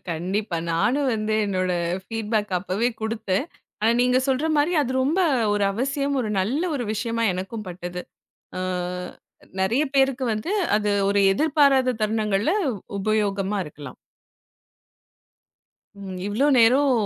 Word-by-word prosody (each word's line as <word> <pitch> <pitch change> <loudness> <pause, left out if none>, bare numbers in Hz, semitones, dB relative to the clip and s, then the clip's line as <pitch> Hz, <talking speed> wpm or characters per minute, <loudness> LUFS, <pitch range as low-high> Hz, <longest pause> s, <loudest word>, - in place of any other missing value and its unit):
கண்டிப்பா 185 +3 -2
நானும் 255 - +1
வந்து 215 0 -1
என்னோட 185 -2 0 0.3
ஃபீட் 225 0 -5
பேக் 210 -2 +1
அப்பவே 200 +6 -1
குடுத்தேன். 220 +1 -1 0.3
ஆனா 220 +2 +3
நீங்கச் 250 +1 +2
சொல்ற 270 +4 +1
மாரி 295 +4 +2
அது 260 - -3
ரொம்ப 310 +8 +1 0.3
ஒரு 205 -1 +1
அவசியம், 275 +5 -1
ஒரு 220 -4 -2
நல்ல 255 - -1
ஒரு 245 - -3
விஷயமா 230 +1 -1
எனக்கும் 195 +3 -5
பட்டது. 180 0 -6 0.6
அ - - -2 1.0
நெறைய 235 +10 +2
பேருக்கு 270 -1 +2
வந்து 215 - -3 0.2
அது 210 0 0 0.2
ஒரு 200 0 +2
எதிர்பாராத 275 -1 +3
தருணங்கள்ல 215 +2 +1 0.5
உபயோகமா 205 -1 0
இருக்கலாம். 150 -1 -10 2.0
ம், 190 -2 -7
இவ்ளோ 225 +8 +1
நேரம் 260 +5 +5
220 Hz, 125 wpm, -23 LUFS, 200-260 Hz, 2.0 s, நேரம்